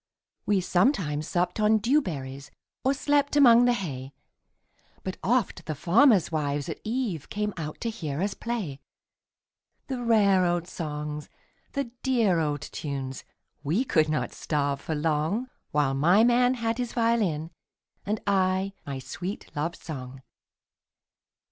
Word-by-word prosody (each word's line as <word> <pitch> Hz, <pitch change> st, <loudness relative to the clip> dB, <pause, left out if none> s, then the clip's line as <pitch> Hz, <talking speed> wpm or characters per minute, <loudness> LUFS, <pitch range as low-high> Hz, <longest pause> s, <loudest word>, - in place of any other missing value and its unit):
We 200 Hz, -2 st, +3 dB
sometimes 175 Hz, -, +1 dB
supped 180 Hz, +4 st, 0 dB
on 215 Hz, +1 st, +4 dB
dew 255 Hz, +8 st, +3 dB
berries, 135 Hz, -, -6 dB, 0.3 s
Or 265 Hz, -, +3 dB
slept 285 Hz, +1 st, +1 dB
among 245 Hz, -4 st, +7 dB
the 245 Hz, -, +4 dB
hay, 140 Hz, -, -5 dB, 0.9 s
But 190 Hz, -, -4 dB
oft 220 Hz, -7 st, 0 dB
the 155 Hz, -, -2 dB
farmers' 195 Hz, -, +4 dB
wives 145 Hz, -2 st, -1 dB
at 160 Hz, -, -6 dB
eveCame 210 Hz, -, -2 dB
out 155 Hz, -3 st, -6 dB
to 235 Hz, -, -1 dB
hear 155 Hz, -10 st, -4 dB
us 200 Hz, +2 st, 0 dB
play; 210 Hz, -, -4 dB, 1.1 s
The 260 Hz, -3 st, -4 dB
rare 205 Hz, -5 st, +4 dB
old 175 Hz, -1 st, +1 dB
songs, 150 Hz, -3 st, -5 dB, 0.4 s
the 275 Hz, -4 st, -2 dB
dear 225 Hz, -10 st, +2 dB
old 150 Hz, -3 st, -1 dB
tunes,—We 140 Hz, -, -4 dB
could 155 Hz, -9 st, +2 dB
not 155 Hz, -, -1 dB
starve 140 Hz, -2 st, -1 dB
for 160 Hz, -, -3 dB
longWhile 150 Hz, -, -1 dB
my 175 Hz, +10 st, +5 dB
man 245 Hz, +1 st, +4 dB
had 230 Hz, 0 st, -2 dB
his 245 Hz, -1 st, -2 dB
violin, 210 Hz, -10 st, +1 dB, 0.5 s
And 210 Hz, +1 st, -1 dB
I 190 Hz, -1 st, +1 dB
my 140 Hz, -1 st, -3 dB
sweet 175 Hz, +7 st, -6 dB
love 165 Hz, +3 st, -2 dB
song. 130 Hz, -3 st, -8 dB
180 Hz, 130 wpm, -27 LUFS, 150-230 Hz, 1.1 s, among